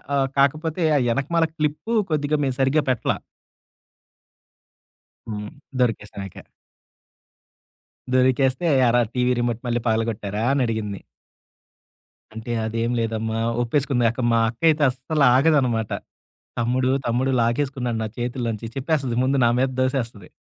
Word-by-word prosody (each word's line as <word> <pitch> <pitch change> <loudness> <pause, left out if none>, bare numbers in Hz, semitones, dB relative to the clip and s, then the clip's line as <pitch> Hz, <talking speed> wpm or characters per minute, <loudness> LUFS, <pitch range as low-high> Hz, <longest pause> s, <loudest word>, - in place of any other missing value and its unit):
ఆహ్, 135 -1 +2
కాకపోతే 155 +5 +1
ఆ - - +4 0.2
ఎనకమాల 165 +6 +1
క్లిప్పు 150 +9 -2 0.2
కొద్దిగా 150 0 +1
మేము 130 -2 -1
సరిగ్గా 135 +3 +3
పెట్టలా. 125 -3 0 2.1
హ్మ్. 105 -1 -5 0.3
దొరికేసామిక. 105 -5 -2 1.8
దొరికేస్తే 130 +4 +2 0.2
"ఏరా? 120 +1 +4
టీవీ 125 0 +2
రిమోట్ 120 -1 -1
మళ్ళీ 120 0 0
పగలగొట్టారా?" 110 -2 -1
అని 140 -2 +2
అడిగింది? 105 -3 -3 1.3
"అంటే 110 +2 -6
అదేం 115 +2 -1
లేదమ్మా!" 110 0 -2 0.2
ఒప్పేసుకుంది 125 -1 +1
అక్క 125 - -5
మా 115 - +4
అక్క 120 - -11
అయితే 155 -1 +2
అస్సలు 135 +4 0
ఆగదనమాట. 130 -7 +2 0.7
"తమ్ముడు 125 +2 +1 0.2
తమ్ముడు 130 +3 +1
లాగేసుకున్నాడు 125 -1 -1
నా - - -2
చేతుల్లోంచి" 120 -2 -3
చెప్పేస్తది 135 -4 -1
ముందు 135 +1 +2
నా 115 - +4
మీద 130 +1 +2
దోసేస్తది. 125 -5 -2
125 Hz, 115 wpm, -23 LUFS, 115-140 Hz, 2.1 s, ఆ